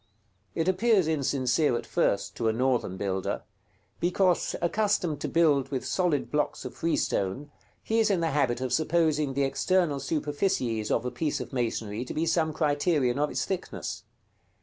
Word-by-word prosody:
It 165 - 0
appears 190 -1 +3
insincere 140 -2 +1
at - - -6
first 100 0 0
to 115 - 0
a 110 - +2
Northern 120 -6 0
builder, 95 -1 -2 0.6
because, 180 +1 +1
accustomed 175 -5 0
to - - -1
build 145 -5 +3
with 135 -3 -3
solid 175 -6 0
blocks 150 -1 -1
of - - -6
freestone, 145 - -1 0.3
he 225 +1 +1
is 220 -1 +3
in 195 -3 +2
the 165 -1 0
habit 130 -4 +1
of 130 -1 -2
supposing 155 -3 +1
the 140 - +2
external 145 +2 +1
superficies 140 - -1
of 115 - 0
a 125 - -2
piece 145 +5 -2
of - - -7
masonry 115 -3 -2
to - - -7
be 160 - 0
some 160 -1 +1
criterion 145 -4 +1
of 150 0 +1
its - - -2
thickness. 190 -2 -4
145 Hz, 165 wpm, -28 LUFS, 125-170 Hz, 0.6 s, appears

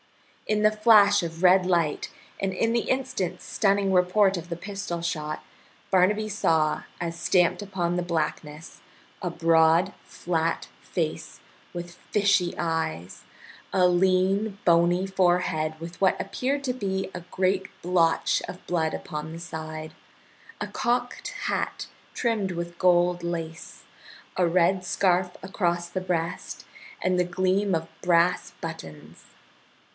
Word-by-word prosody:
In 210 0 +1
the 215 - +6
flash 215 -2 +5
of 165 +1 -5
red 185 0 +6
light, 170 -5 0 0.3
and 195 -1 -1
in 225 +5 +1
the 235 - 0
instant 250 -9 -1
stunning 200 -1 +1
report 190 +2 +4
of 175 0 -6
the 170 - -4
pistol 195 -2 -5
shot, 155 -2 -3 0.5
Barnaby 205 +3 +3
saw, 160 -7 +1 0.2
as 170 -1 -4
stamped 180 +2 +2
upon 185 -4 -2
the 180 - 0
blackness, 155 -2 -4 0.4
a 180 - -1
broad, 165 +2 +3
flat 165 -1 -2
face - - -4 0.3
with 175 0 -7 0.2
fishy 200 -4 +3
eyes, 160 - -3 0.5
a 180 -1 +4
lean, 190 +3 +2
bony 175 +2 +4
forehead 175 -4 +1
with 170 +3 -9
what 190 - +3
appeared 270 +8 -2
to 250 - 0
be 190 -5 -3
a 180 - -6
great 190 0 +1 0.2
blotch 170 -2 +2
of 180 - -9
blood 160 -3 0
upon 150 +1 -6
the 165 - -7
side, 155 -1 -7 0.7
a - - -3
cocked 245 +1 -1
hat - - -2 0.3
trimmed 220 -6 0
with 170 0 -5
gold 175 -1 +3
lace, 165 -1 -5 0.5
a 180 -2 +2
red 180 +2 +2
scarf 180 -1 +1
across 175 -3 -1
the 185 - -4
breast, 175 -2 -3 0.4
and 185 -1 +2
the - - +4
gleam 185 +2 +1
of 165 0 -3
brass 175 0 +2
buttons. 80 - -9
180 Hz, 130 wpm, -26 LUFS, 170-195 Hz, 0.7 s, the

